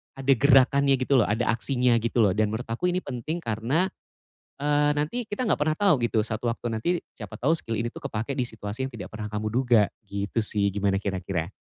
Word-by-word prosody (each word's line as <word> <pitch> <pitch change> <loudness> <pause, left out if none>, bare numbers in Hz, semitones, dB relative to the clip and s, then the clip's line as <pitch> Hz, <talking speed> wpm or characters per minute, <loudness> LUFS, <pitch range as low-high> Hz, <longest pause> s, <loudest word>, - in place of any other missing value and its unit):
ada 135 0 +3
gerakannya 140 +1 +5
gitu 135 +1 +3
loh, 110 - +4
ada 110 +4 0
aksinya 125 +1 +2
gitu 115 +2 -1
loh. 100 - +4
Dan 110 0 +2
menurut 110 +3 -4
aku 120 +10 -1
ini 180 - 0
penting 140 +6 -4
karena, 120 - 0 0.8
eee, 145 0 +2
nanti 155 +12 -1
kita 210 +5 -2
enggak - - +1
pernah 155 +1 +1
tau 200 -6 +4
gitu, 115 -1 +2
satu 110 +1 -4
waktu 115 +1 -5
nanti 110 +7 -2 0.3
siapa 110 0 -9
tau 140 +6 +2
skill 115 -8 -2
ini 115 - -1
tuh - - -11
kepake 110 +5 -3
di 130 - +1
situasi 110 +1 -5
yang 135 - -9
tidak 115 - -7
pernah 105 -1 -5
kamu 105 0 -2
duga, 120 -3 +4 0.2
gitu 100 +2 -4
sih, 105 -1 0
gimana 100 -1 +1
kira-kira? 95 -2 -3
120 Hz, 210 wpm, -26 LUFS, 105-140 Hz, 0.8 s, gerakannya